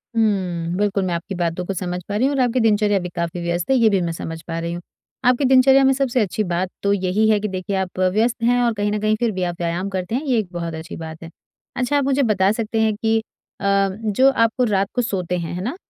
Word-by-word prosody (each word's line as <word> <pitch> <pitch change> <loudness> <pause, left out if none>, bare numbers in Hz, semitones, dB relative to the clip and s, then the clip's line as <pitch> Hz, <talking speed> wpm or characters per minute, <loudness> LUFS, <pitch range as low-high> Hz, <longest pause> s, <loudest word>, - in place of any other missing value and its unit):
हुँ, 180 -6 0
बिल्कुल 200 -1 +1
मैं 180 - -1
आपकी 170 +4 -4
बातों 175 0 -2
को 195 - -3
समझ 180 0 -3
पा 205 - -2
रही 245 +6 +2
हूँ 285 - -1
और 270 - +2
आपकी 250 0 +1
दिनचर्या 210 -3 +3
भी 180 -1 -5
काफ़ी 170 +1 -3
व्यस्त 170 +3 -2
है, - - +5
ये 230 -3 +5
भी 195 -3 +1
मैं 170 -1 -1
समझ 165 0 -6
पा 165 +1 -5
रही 170 0 -3
हूँ। 175 - -6 0.4
आपकी 250 +3 +3
दिनचर्या 265 +1 +6
में 270 - +5
सबसे 260 -2 0
अच्छी 210 +1 -1
बात 180 0 -1
तो 200 0 +3
यही 195 +3 +1
है 215 -1 +4
कि 210 - -2
देखिए 190 +1 -3
आप 190 -1 -3
व्यस्त 215 +6 +1
हैं 245 +1 +3
और 235 -1 +2
कहीं 205 -1 -1
न 210 - -1
कहीं 215 0 +2
फिर 235 -2 +1
भी 185 -2 -3
आप 175 -1 -2
व्यायाम 175 +3 -2
करते 190 +2 -3
हैं 270 - -1
ये 255 -4 +1
एक 210 - -3
बहुत 170 -2 -4
अच्छी 160 0 -7
बात 160 0 -8
है। 165 - -8 0.5
अच्छा, 250 +4 0
आप 285 - +2
मुझे 275 +1 +2
बता 200 -4 +2
सकते 220 0 -1
हैं 220 -1 +2
कि, 225 +1 +1 0.4
अ, - - -10 0.4
जो 235 +6 +4
आप 230 0 +1
रात 195 -1 +1
को 250 - +2
सोते 180 -6 -2
हैं, 170 -1 -4
है 180 - -4
ना? 245 - -3
200 Hz, 265 wpm, -21 LUFS, 180-230 Hz, 0.5 s, दिनचर्या